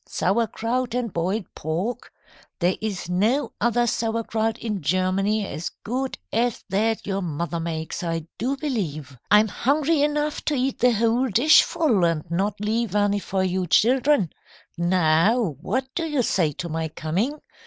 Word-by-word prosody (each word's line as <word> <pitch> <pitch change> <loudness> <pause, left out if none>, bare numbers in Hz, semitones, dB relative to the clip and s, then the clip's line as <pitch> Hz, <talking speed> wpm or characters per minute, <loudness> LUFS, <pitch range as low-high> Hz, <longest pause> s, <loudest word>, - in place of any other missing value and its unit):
Sauerkraut 230 +4 -1
and 240 -5 -2
boiled 185 +5 -1
pork. 185 +11 -3 0.5
There 180 +1 +1
is 200 -5 -3
no 215 +11 +1
other 240 0 +2
sauerkraut 225 -1 -1
in 210 -5 -3
Germany 185 +5 +1
as 160 -1 -4
good 260 +4 -2 0.2
as 235 +1 0
that 220 +3 0
your 195 0 -2
mother 170 0 -3
makes, 160 -1 -4
I 165 -2 -2
do 265 +5 -1
believe. 160 - -3
I'm 210 +1 +6
hungry 290 - +1
enough 295 0 0
to 300 - +1
eat 265 0 -1
the 250 0 +5
whole 230 +4 +2
dishful 250 - +4
and 165 -3 +1
not 195 +4 -1
leave 215 0 -1
any 205 0 +2
for 190 -1 -1
you 185 0 -1
children. 245 - +3 0.4
Now 175 +4 +3 0.2
what 260 +8 -1
do 330 -1 -2
you 290 -5 0
say 170 -8 +1
to 170 - -5
my 160 0 -2
coming? 185 - -2
210 Hz, 150 wpm, -24 LUFS, 175-245 Hz, 0.5 s, I'm